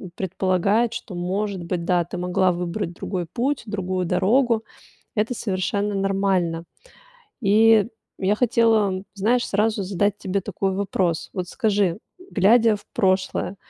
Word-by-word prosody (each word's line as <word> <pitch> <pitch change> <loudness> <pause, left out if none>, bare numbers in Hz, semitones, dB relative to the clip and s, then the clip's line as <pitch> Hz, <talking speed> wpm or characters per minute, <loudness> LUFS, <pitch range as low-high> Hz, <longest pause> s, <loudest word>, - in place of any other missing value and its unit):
предполагать, 195 +5 +1
что, 200 -5 -7
может 190 +1 -2
быть, 170 0 -3
да, 175 -2 +2
ты - - -7
могла 180 +1 +2
выбрать 175 +1 -3
другой 180 0 -4
путь, 255 +8 -1
другую 185 -3 -2
дорогу. 220 +6 +2 0.5
Это 220 +4 0
совершенно 200 0 -1
нормально. 195 -4 0 0.8
И 220 +1 +5 0.3
я 195 +2 +1
хотела, 220 -5 +2
знаешь, 230 +5 +1
сразу 210 0 +1
задать 200 +2 0
тебе 190 +1 -2
такой 195 +1 -2
вопрос. 185 -4 -1
Вот 180 -2 -3
скажи, 205 -6 0 0.3
глядя 220 +2 +4
в 205 - -13
прошлое, 185 0 0
195 Hz, 125 wpm, -23 LUFS, 185-215 Hz, 0.8 s, И